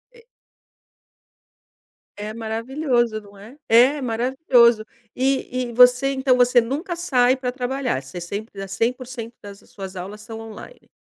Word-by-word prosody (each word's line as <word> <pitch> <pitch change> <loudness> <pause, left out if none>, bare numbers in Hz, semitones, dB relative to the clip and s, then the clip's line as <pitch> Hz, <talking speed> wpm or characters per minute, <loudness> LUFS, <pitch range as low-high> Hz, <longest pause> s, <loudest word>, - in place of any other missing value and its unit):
É 470 - -18 1.9
É 210 +1 -5
maravilhoso, 235 +1 -1
não 205 -1 -17
é 220 +8 -13
é 255 +6 +5
maravilhoso, 240 -1 +3 0.3
e 255 -1 -1
e - - -10
você 250 +3 +5
então 265 -1 +2
você 245 0 +5
nunca 295 +10 -4
sai 260 -8 +2
pra 255 -1 -3
trabalhar, 250 - -2
você 130 +7 -8
sempre 200 +4 -6
dá 195 - -5
100% 235 +3 -3
das 200 -1 -11
suas 190 -1 -8
aulas 195 +4 -7
são 225 +1 -9
online. 225 - -11
245 Hz, 135 wpm, -22 LUFS, 215-260 Hz, 1.9 s, é